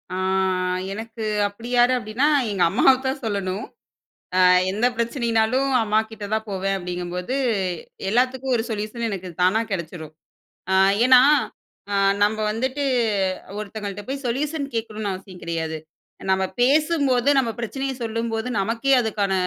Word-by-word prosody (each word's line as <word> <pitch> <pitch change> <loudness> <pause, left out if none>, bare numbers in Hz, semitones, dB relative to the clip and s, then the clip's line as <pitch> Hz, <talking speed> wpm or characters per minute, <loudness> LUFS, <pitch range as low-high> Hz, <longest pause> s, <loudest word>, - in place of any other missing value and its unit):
ஆ - - -3 0.7
எனக்கு 225 +2 -6 0.2
அப்பிடி 225 +4 -9
யாரு? 245 +1 +5
அப்பிடின்னா, 235 +5 0 0.2
எங்க 190 -3 +1
அம்மாவத்தான் 265 +5 +2
சொல்லணும். 200 -2 -2 0.7
அ - - +4 0.3
எந்த 215 +5 0
பிரச்சனையினாலும் 235 +1 +1
அம்மாக்கிட்ட 220 0 -1
தான் 220 0 -1
போவேன் 195 0 -1
அப்பிடிங்கம்போது, 180 +5 -4 0.7
எல்லாத்துக்கும் 255 +3 +1
ஒரு 225 - 0
சொல்யூஷன் 220 +2 -3
எனக்கு 185 -2 -5
தானா 185 +5 +3
கெடைச்சிரும். 160 -3 -5 0.6
அ - - +4 0.3
ஏன்னா, 255 -1 +8 0.7
அ - - 0 0.3
நம்ம 210 +1 +2
வந்துட்டு 260 +6 -2 0.7
ஒருத்தங்கள்ட்ட 205 -1 -6
போய் 275 0 -4
சொல்யூஷன் 285 +4 -2
கேட்கணுன்னு 215 -3 -3
அவசியம் 185 -1 -10
கிடையாது. 160 -1 -3 0.5
நம்ம 190 0 +2 0.2
பேசும்போது 280 -2 +2
நம்ம 235 - -2
பிரச்சனைய 270 +4 -3
சொல்லும்போது, 225 +1 -2
நமக்கே 230 +7 +1
அதுக்கான 205 -3 -1
220 Hz, 120 wpm, -23 LUFS, 195-255 Hz, 0.7 s, ஏன்னா